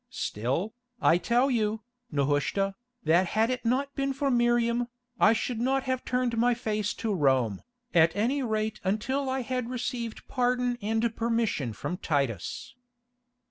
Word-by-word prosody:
Still, 135 - -2 0.3
I 170 - +4
tell 240 +8 +2
you, 220 -2 0 0.3
Nehushta, 145 +7 +1 0.3
that 175 +3 +4
had 220 +6 +2
it 255 -1 -3
not 270 +4 0
been 275 0 -1
for 275 +1 0
Miriam, 240 0 +2 0.3
I 215 - +6
should 230 +1 -2
not 265 +2 +1
have 260 -1 -1
turned 250 -2 0
my 240 +1 +3
face 215 -3 -2
to 225 -2 -2
Rome, 130 - +2 0.3
at 165 -1 +5
any 245 +7 +1
rate 220 -2 -1
until 260 +8 0
I 260 0 0
had 250 -1 -3
received 240 -2 -4
pardon 250 -1 0
and 225 +2 0
permission 225 - 0
from 175 - -4
Titus." 140 - -2
230 Hz, 145 wpm, -28 LUFS, 190-250 Hz, 0.3 s, I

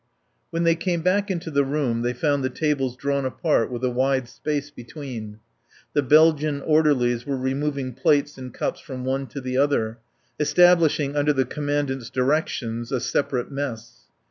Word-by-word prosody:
When 170 0 -1
they 165 0 +4
came 170 0 -2
back 200 +3 +2
into 170 -3 -3
the 140 -1 +3
room 135 -4 -1
they 120 +1 0
found 145 +2 0
the 130 - 0
tables 135 -3 -1
drawn 140 0 -1
apart 130 -1 +1
with 125 0 -5
a 125 - +2
wide 130 0 +1
space 145 +2 -3
between. 120 -5 -8 0.6
The 145 - +3
Belgian 150 +1 +4
orderlies 140 -7 +2
were 140 -1 -1
removing 135 0 -2
plates 145 +3 +2
and 130 -1 -8
cups - - -3
from 130 -2 -7
one 135 +1 -1
to 130 +4 -7
the 130 -1 -3
other, 120 -5 +1 0.4
establishing 155 -2 +4
under 145 0 +2
the 135 -2 +1
Commandant's 145 -3 -2
directions 125 -4 -1
a 130 - 0
separate 125 0 -1
mess. 120 - -6
140 Hz, 165 wpm, -24 LUFS, 125-150 Hz, 0.6 s, they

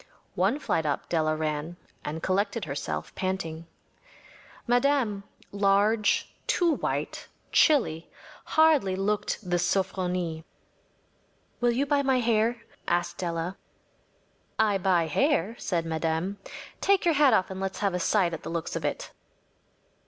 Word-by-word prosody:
‚ÄĚ - - -25 0.3
One 275 - +1
flight 165 - -1
up 145 -2 -2
Della 155 -2 +1
ran, 155 +2 -3 0.3
and 160 +2 -5
collected 200 +3 0
herself, 80 - -4
panting. 165 -4 -3 1.0
Madame, 245 -4 +2 0.3
large, 205 +2 +2
too 345 -2 +3
white, - - -3 0.2
chilly, 225 - +3 0.4
hardly 310 -12 +3
looked 205 +2 -1
the 175 0 +1
‚ÄúSofronie.‚ÄĚ 180 -2 -1 1.2
“Will 240 - +3
you 265 +4 +1
buy 285 0 +2
my 265 -2 +2
hair?‚ÄĚ 230 0 +1 0.3
asked 175 0 0
Della. 170 +1 -3 1.0
“I 210 -3 +2
buy 180 -3 +2
hair,‚ÄĚ 225 - 0
said 170 -3 -1
Madame. 165 +4 -2 0.4
“Take 395 -2 +3
yer 340 - +4
hat 285 -4 +5
off 185 -1 0
and 190 0 -5
let’s 195 0 -3
have 200 -2 +1
a 180 - -1
sight 180 -1 +2
at 165 - -5
the - - -7
looks 165 0 -3
of 165 - -3
it. 145 - -3
190 Hz, 135 wpm, -27 LUFS, 165-230 Hz, 1.2 s, hat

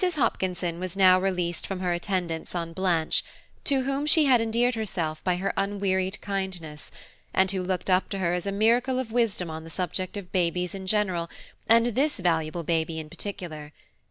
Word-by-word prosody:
HOPKINSON 185 - 0
was 185 0 -5
now 185 -1 +6
released 180 -3 -1
from 195 -2 -4
her 180 -1 +1
attendance 175 -2 -2
on 165 -1 -3
Blanche, 175 -3 +1 0.4
to 270 -2 +2
whom 275 +2 -1
she 310 0 +7
had 250 -4 +5
endeared 235 +2 +2
herself 175 -8 -3
by 180 -1 +2
her 190 +2 -1
unwearied 195 -1 0
kindness, 185 -6 -4 0.5
and 190 0 +4
who 190 -2 -1
looked 180 -1 -2
up 185 0 +2
to 195 - -3
her 175 -2 0
as 180 +2 -2
a - - 0
miracle 235 +5 +2
of 255 -3 -3
wisdom 220 -8 0
on 160 0 -6
the 165 - -10
subject 185 +3 -3
of 185 -3 -8
babies 180 -1 0
in 190 -1 -7
general, 185 -5 0 0.4
and 230 +1 +6
this 290 +6 +1
valuable 165 -2 0
baby 160 0 0
in 155 -1 -7
particular. 160 -7 -6
185 Hz, 185 wpm, -26 LUFS, 170-205 Hz, 0.5 s, she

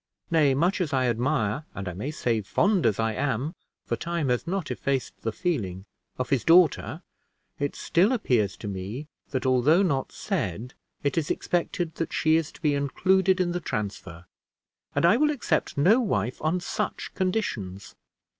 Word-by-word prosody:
Nay, 150 -5 +4
much 175 +7 +1
as 155 -5 -1
I 130 -1 +2
admire, 120 +1 0
and 100 -1 -5
I 90 - -3
may 105 +11 -4
say, 120 -7 0
fond 195 - +2
as 105 -1 0
I 115 0 +1
am 140 +5 -1 0.3
(for - - -1
time 170 -5 -2
has 125 +6 0
not 190 -1 -2
effaced 135 -2 -2
the 115 - -1
feeling) 105 - -2 0.3
of 130 - -3
his 135 -4 +2
daughter, 170 -2 +4 0.6
it 145 0 -1
still 185 +7 +2
appears 125 - +1
to 105 - -7
me 100 +8 -5 0.2
that, 130 -2 -2
although 130 +8 +4
not 140 -8 0
said, 125 - -3 0.3
it 145 +3 +1
is 155 - -4
expected 175 -1 -1
that 165 - -3
she 155 0 +3
is 160 -2 0
to - - -16
be 150 -3 +2
included 185 +7 +2
in 180 -1 +1
the 175 - -1
transfer; 100 - -5 0.7
and - - +3
I 190 +7 +6
will 300 +3 +3
accept 235 - -1
no 195 - +5
wife 125 - -1
on 165 +4 0
such - - -3
conditions." 115 - -2
145 Hz, 175 wpm, -26 LUFS, 115-175 Hz, 0.7 s, I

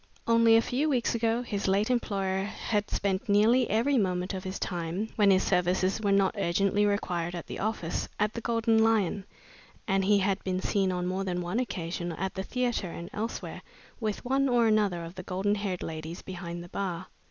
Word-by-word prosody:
Only 230 -1 +5
a 225 - +3
few 285 +5 0
weeks 250 -5 +1
ago, 230 +1 +1
his 205 -4 -3
late 200 +5 +2
employer 195 -5 0
had 210 0 -2
spent 200 +3 -1
nearly 225 +5 +4
every 240 +6 +2
moment 180 -1 -1
of 190 -1 -4
his 190 +1 -4
time, 175 +4 -3
when 205 -2 +4
his 190 -1 +4
services 185 +2 +1
were 200 -2 +1
not 195 -1 +3
urgently 200 +3 +2
required 175 -4 -1
at 170 - -6
the - - -7
office, 205 -6 -2
at 210 +1 +1
the 235 - -5
Golden 230 -1 +2
Lion, 205 -3 +1 0.6
and 195 -1 +2
he 205 +1 +4
had 195 0 0
been 185 -1 -1
seen 190 0 +1
on 180 -1 -2
more 185 +2 -1
than 180 -2 -2
one 180 +6 -2
occasion 175 -7 -3
at 190 +4 -3
the 190 - -3
theatre 240 -2 -1
and 170 +1 -8
elsewhere 225 +2 -4 0.4
with 215 0 -3
one 270 +2 +2
or 240 -2 +4
another 205 -6 +2
of 165 - -9
the 185 - -7
golden 190 +2 -1
haired 200 -3 -2
ladies 160 +1 -6
behind 175 -2 -6
the 175 - -12
bar. 185 -2 -3
195 Hz, 200 wpm, -28 LUFS, 180-225 Hz, 0.6 s, Only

